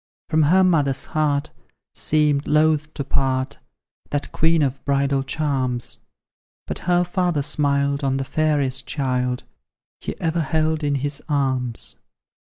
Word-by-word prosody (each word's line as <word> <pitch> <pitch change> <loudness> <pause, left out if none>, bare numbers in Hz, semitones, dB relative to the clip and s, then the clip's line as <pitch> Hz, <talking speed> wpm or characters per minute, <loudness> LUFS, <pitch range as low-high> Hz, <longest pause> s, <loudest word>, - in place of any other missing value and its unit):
From 155 0 +3
her 180 +6 +5
mother's 145 -7 +2
heart 150 -1 0 0.4
seemed 150 -2 +2
loath 155 0 +2
to 140 - -2
part 135 0 -1 0.5
That 145 0 -2
queen 165 -1 +3
of 135 0 -2
bridal 140 -1 +1
charms, 135 -4 -2 0.7
But - - -5
her 175 0 +4
father 175 -4 0
smiled 140 -1 +1
on 135 -1 +1
the 135 - -2
fairest 140 -3 0
child 125 -3 -1 0.6
He - - -6
ever 165 0 0
held 155 +1 0
in 145 -1 +1
his 140 +1 -1
arms. 130 -5 0
145 Hz, 130 wpm, -22 LUFS, 135-155 Hz, 0.7 s, her